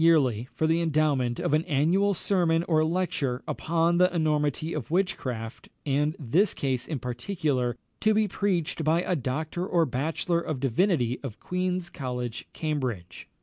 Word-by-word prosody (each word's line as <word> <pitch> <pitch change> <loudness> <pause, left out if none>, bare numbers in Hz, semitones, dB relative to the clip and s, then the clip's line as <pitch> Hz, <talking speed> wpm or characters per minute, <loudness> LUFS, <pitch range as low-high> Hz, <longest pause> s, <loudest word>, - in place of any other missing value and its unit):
yearly, 135 -9 +4
for 160 - +1
the 165 +1 +2
endowment 145 -7 +1
of - - 0
an 155 +1 +3
annual 180 +7 +2
sermon 170 -3 +2
or 155 -2 +2
lecture 155 -7 -1
upon 170 +1 +1
the 180 0 +4
enormity 155 0 0
of 135 -7 -4
witchcraft, 130 -11 -2 0.2
and 150 +2 +1
this 160 - +2
case 130 -3 -1
in 155 - -2
particular, 125 - -1 0.2
to 215 - +3
be 215 0 +3
preached 180 -5 -1
by 160 +3 +2
a 180 - 0
doctor 155 +5 -2
or 175 -3 +2
bachelor 160 +5 -1
of 155 -5 -3
divinity 130 - +1
of 120 -6 -7
Queen's 180 -1 -2
College, 125 -5 -4
Cambridge. 130 - -3
155 Hz, 150 wpm, -27 LUFS, 130-175 Hz, 0.2 s, yearly